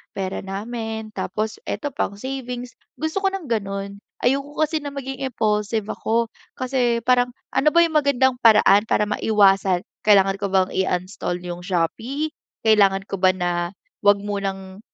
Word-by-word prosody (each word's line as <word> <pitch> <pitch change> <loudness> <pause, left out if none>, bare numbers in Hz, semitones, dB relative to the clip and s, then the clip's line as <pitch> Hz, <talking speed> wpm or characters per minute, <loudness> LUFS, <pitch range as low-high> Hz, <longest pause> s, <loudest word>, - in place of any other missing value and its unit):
pera 190 -1 -3
namin, 220 +2 -5
tapos 215 +1 -3
eto 290 - -3
pang 200 - -2
savings, 250 0 -5 0.3
gusto 315 +4 -1
ko - - +4
ng 350 -9 -5
gano'n. 200 -2 -3 0.3
Ayoko 275 +3 0
kasi 310 0 0
na 285 -1 -6
maging 270 0 -4
impulsive 215 -2 0
ako, 230 0 0 0.3
kasi 250 -2 0
parang 245 0 +3 0.2
ano 295 - +2
ba 340 - +6
yung 320 -2 +1
magandang 265 -3 +2
paraan 210 -2 +6
para - - +2
maiwasan, 195 -4 +3 0.2
kailangan 195 -1 +5
ko 200 - 0
bang 190 -1 +3
i-uninstall 185 -1 -1
yung 175 0 -5
Shopee? 225 - -1 0.3
Kailangan 200 -3 +4
ko 195 - -3
ba 185 0 +5
na 175 0 -1 0.3
huwag 205 0 +5
munang 195 -1 -4
215 Hz, 150 wpm, -22 LUFS, 195-255 Hz, 0.3 s, ba